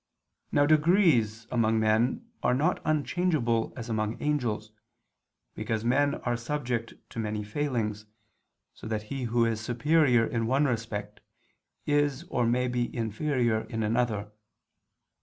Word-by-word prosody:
Now 145 - +4
degrees 150 - +3
among 115 -2 +2
men 115 - +1
are 125 - +2
not 145 +4 +1
unchangeable 150 -6 +1
as 120 -2 -6
among 110 -1 -2
angels, 120 -8 -1 0.8
because 110 0 -3
men 140 +4 +2
are 120 -1 0
subject 120 -2 -3 0.2
to - - -6
many 105 -1 -2
failings, 110 -3 -2 0.7
so - - -10
that 110 -1 -2
he 135 -2 -3
who 120 0 +2
is 115 -1 -1
superior 125 +1 +3
in 115 -1 -1
one 135 +4 +3
respect, 115 -5 -3 0.7
is 145 -2 +1
or 120 -2 +1
may 125 +2 +1
be 120 -1 -2
inferior 115 0 0
in 115 -1 -3
another. 110 -2 0
120 Hz, 130 wpm, -28 LUFS, 110-145 Hz, 0.8 s, Now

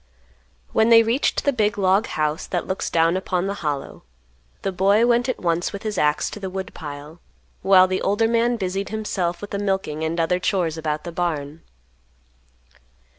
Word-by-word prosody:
When 220 - +3
they 230 -1 +8
reached 235 +5 0
the 285 - +2
big 215 -4 +1
log 195 +2 +2
house 155 +2 -2
that 175 - -2
looks 190 - -3
down 165 +1 +2
upon 185 -1 -1
the 200 - -1
Hollow, 145 -3 -4 0.6
the 195 - -1
boy 200 +5 +3
went 240 +1 +2
at 255 - -1
once 170 0 0
with 200 - -7
his 215 -1 -3
axe 150 0 +2
to - - -7
the 190 -2 -4
woodpile, 160 -4 -7 0.4
while 190 -1 +6
the 185 0 -2
older 205 +3 +2
man 235 +1 +2
busied 195 0 -3
himself 195 -5 -2
with 205 - -8
the 200 - -2
milking 190 -6 -2
and 165 +2 -2
other 180 +2 +1
chores 180 -4 0
about 155 -1 -3
the 170 - -6
barn. 160 -3 -3
185 Hz, 180 wpm, -22 LUFS, 165-205 Hz, 0.6 s, they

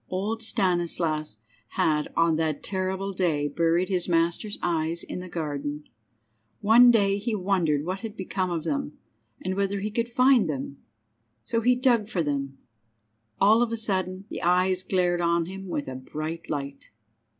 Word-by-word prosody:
Old 205 +5 -2
Stanislas 175 - 0 0.4
had 150 -1 +2
on 165 -1 +4
that 160 -2 -1
terrible 190 0 -2
day 160 -6 0
buried 165 +4 +1
his 180 -2 -1
master's 170 +5 0
eyes 165 0 -1
in - - -6
the 180 0 -8
garden. 150 -3 -4 0.8
One 230 +4 +7
day 200 -4 +3
he 220 +2 -2
wondered 180 -7 +1
what 185 +2 -3
had 220 0 -7
become 190 0 -2
of 170 -3 -2
them, 150 -2 -3 0.5
and 185 - 0
whether 200 +1 -1
he 210 +2 -3
could 230 +2 -1
find 250 -5 +4
them. 140 -1 -4 0.7
So 230 - -1
he 250 +2 +4
dug 240 -4 +2
for 175 -5 0
them. 140 -2 -3 0.8
All 215 +4 +5
of 240 -1 +1
a 230 - -1
sudden 190 -3 -1
the - - -6
eyes 185 +1 +2
glared 180 -2 +1
on 170 0 +2
him 195 +2 -8
with 150 -5 -3
a 130 0 -5
bright 155 +5 -6
light. 140 -2 -5
180 Hz, 160 wpm, -26 LUFS, 160-200 Hz, 0.8 s, One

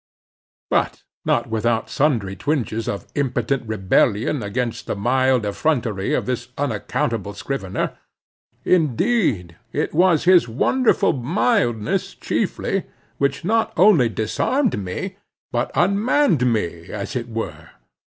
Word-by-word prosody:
But - - 0 0.2
not 120 - +2
without 115 0 0
sundry 115 -10 0
twinges 115 - -2
of 100 - -4
impotent 130 -2 -1
rebellion 110 +5 +1
against 115 +3 -3
the - - -1
mild 130 +2 +2
effrontery 110 -3 0
of - - -1
this 125 -1 -3
unaccountable 110 -5 -2
scrivener. 100 -5 -3 0.7
Indeed, 155 - +1
it - - -2
was 175 -1 +4
his 180 -3 +5
wonderful 245 - +2
mildness 130 - 0
chiefly, - - -1 0.3
which 140 +4 0
not 225 +2 +1
only 180 - +6
disarmed 110 - 0
me, 185 - -5 0.3
but 120 +1 0
unmanned 200 - +3
me, 85 -6 -2
as 100 +3 -5
it 120 -1 -3
were. 115 0 -5
125 Hz, 110 wpm, -21 LUFS, 110-165 Hz, 0.7 s, only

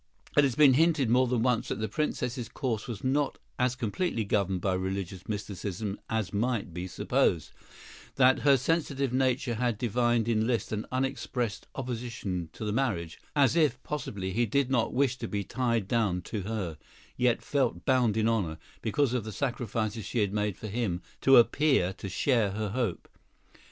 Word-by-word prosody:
It 145 - +6
has 135 -4 +1
been 145 -2 +7
hinted 150 -4 +3
more 130 +1 +4
than 120 -2 +1
once 125 -3 +1
that - - -2
the 110 - -1
Princess's 125 -1 -2
course 120 -7 -3
was 115 -5 -6
not 140 +2 +1 0.2
as 125 0 +2
completely 120 - -1
governed 100 -2 0
by 95 +1 0
religious 95 0 -4
mysticism 100 -1 -4
as 110 -6 -1
might 110 -4 -1
be 90 +2 -4
supposed—that 125 - 0
her 140 -1 +5
sensitive 140 -2 0
nature 130 -1 +1
had 120 -1 0
divined 120 0 +1
in 110 -1 +2
Liszt 120 -2 -1
an 105 0 -3
unexpressed 130 -4 -2
opposition 115 -9 -4
to 110 - -6
the 105 - -1
marriage, 105 -9 -1 0.2
as 140 0 +4
if, 150 -7 +3
possibly, 100 -10 -4
he 115 +4 +1
did 135 +4 +1
not 120 -3 +2
wish 130 -1 +1
to 115 - -3
be 100 -1 -2
tied 115 -3 -1
down 105 -6 +1
to 105 +1 -4
her, 95 -6 -4 0.4
yet 125 -2 +1
felt 125 - 0
bound 125 -5 +3
in 110 0 +2
honor, 95 -9 0 0.2
because 125 +3 +1
of 125 -3 0
the 110 - -6
sacrifices 115 -3 -2
she 120 - -5
had 100 -3 +1
made 105 -2 -1
for - - -9
him, 100 -5 -2 0.2
to 135 -1 +7
appear 120 - +4
to 95 - -7
share 110 -1 +1
her 105 0 -2
hope. 115 -4 -2
115 Hz, 175 wpm, -29 LUFS, 100-130 Hz, 0.4 s, been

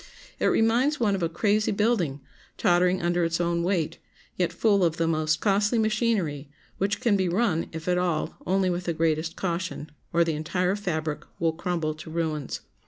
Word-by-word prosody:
It - - +2
reminds 245 +7 +2
one 215 -4 +2
of 195 - -1
a 165 - +1
crazy 210 +5 +1
building, 200 - +1 0.4
tottering 180 +1 +3
under 175 0 +1
its 165 0 0
own 170 -1 +1
weight, 175 -3 -1 0.4
yet 175 -2 0
full 200 +2 +2
of 165 -2 +1
the 165 - +1
most 155 -1 +1
costly 205 +3 +2
machinery, 215 - 0 0.3
which 205 +2 0
can 235 -5 +3
be 190 -2 +1
run, 180 -3 +1
if 160 +1 -7
at 180 0 +2
all, 175 -4 -1
only 190 0 +2
with 175 0 -3
the 170 - 0
greatest 160 0 0
caution, 170 -4 -3 0.2
or 170 0 +4
the 165 -1 -1
entire 180 +5 0
fabric 160 -6 -2 0.2
will 165 -1 +1
crumble 170 -2 -2
to 155 +1 -10
ruins. 160 -3 -3
175 Hz, 180 wpm, -26 LUFS, 160-200 Hz, 0.4 s, or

